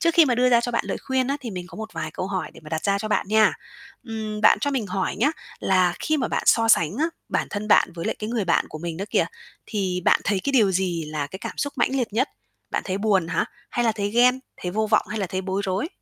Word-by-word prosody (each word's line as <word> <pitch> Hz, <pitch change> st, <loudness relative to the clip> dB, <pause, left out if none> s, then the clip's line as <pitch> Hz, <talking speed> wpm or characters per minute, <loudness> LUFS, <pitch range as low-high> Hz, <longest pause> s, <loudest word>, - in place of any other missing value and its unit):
Trước 335 Hz, 0 st, +2 dB
khi 330 Hz, -, +8 dB
mà 250 Hz, -4 st, +2 dB
đưa 250 Hz, +1 st, +3 dB
ra 235 Hz, -1 st, +6 dB
cho 245 Hz, 0 st, -3 dB
bạn 235 Hz, -, 0 dB
lời -, -, -2 dB
khuyên 260 Hz, -1 st, 0 dB
á 280 Hz, -, 0 dB
thì 240 Hz, -, -6 dB
mình 180 Hz, -3 st, -5 dB
có -, -, -12 dB
một 220 Hz, +1 st, -5 dB
vài 155 Hz, -1 st, -4 dB
câu 185 Hz, -, -4 dB
hỏi 190 Hz, -1 st, -3 dB
để -, -, -13 dB
mà -, -, -9 dB
đặt 160 Hz, 0 st, -3 dB
ra 200 Hz, -1 st, +2 dB
cho 215 Hz, -, -4 dB
bạn 210 Hz, -, 0 dB
nha. 215 Hz, 0 st, +5 dB, 0.5 s
Ừm, 220 Hz, -3 st, -5 dB
bạn -, -, +6 dB
cho 285 Hz, -, 0 dB
mình 255 Hz, -6 st, -1 dB
hỏi 190 Hz, 0 st, -2 dB
nhá, 265 Hz, +8 st, +3 dB, 0.3 s
là 185 Hz, -2 st, +3 dB
khi 310 Hz, 0 st, 0 dB
mà 260 Hz, -, -1 dB
bạn -, -, -1 dB
so 225 Hz, -1 st, +5 dB
sánh 170 Hz, -2 st, +4 dB
á, 320 Hz, -, +3 dB, 0.2 s
bản -, -, 0 dB
thân 210 Hz, +1 st, -4 dB
bạn 180 Hz, -, +5 dB
với 165 Hz, -, -5 dB
lại -, -, 0 dB
cái 215 Hz, +1 st, -4 dB
người 230 Hz, -4 st, 0 dB
bạn 170 Hz, -, +2 dB
của 155 Hz, -, -7 dB
mình 170 Hz, 0 st, -4 dB
đó 195 Hz, -, -3 dB
kìa, -, -, +2 dB, 0.4 s
thì 190 Hz, -4 st, -1 dB
bạn -, -, +4 dB
thấy 200 Hz, -2 st, +1 dB
cái 280 Hz, -, 0 dB
điều 215 Hz, -7 st, +4 dB
gì 175 Hz, -3 st, 0 dB
là 150 Hz, -1 st, -3 dB
cái 190 Hz, +7 st, -9 dB
cảm -, -, -6 dB
xúc 285 Hz, -, -1 dB
mãnh 245 Hz, -, +2 dB
liệt 240 Hz, -6 st, -1 dB
nhất? 255 Hz, +6 st, +1 dB, 0.4 s
Bạn -, -, -1 dB
thấy 190 Hz, 0 st, -2 dB
buồn 195 Hz, -5 st, +2 dB
hả? 165 Hz, -, +1 dB, 0.3 s
Hay 240 Hz, -, 0 dB
là 225 Hz, -, +3 dB
thấy 205 Hz, -1 st, -2 dB
ghen, 250 Hz, +3 st, +4 dB, 0.2 s
thấy 180 Hz, -, -2 dB
vô 215 Hz, +3 st, 0 dB
vọng 215 Hz, 0 st, +2 dB
hay 215 Hz, -, -3 dB
là 195 Hz, -, -1 dB
thấy 185 Hz, +1 st, -3 dB
bối 190 Hz, +1 st, -2 dB
rối? 195 Hz, -, -1 dB
210 Hz, 290 wpm, -24 LUFS, 185-235 Hz, 0.5 s, khi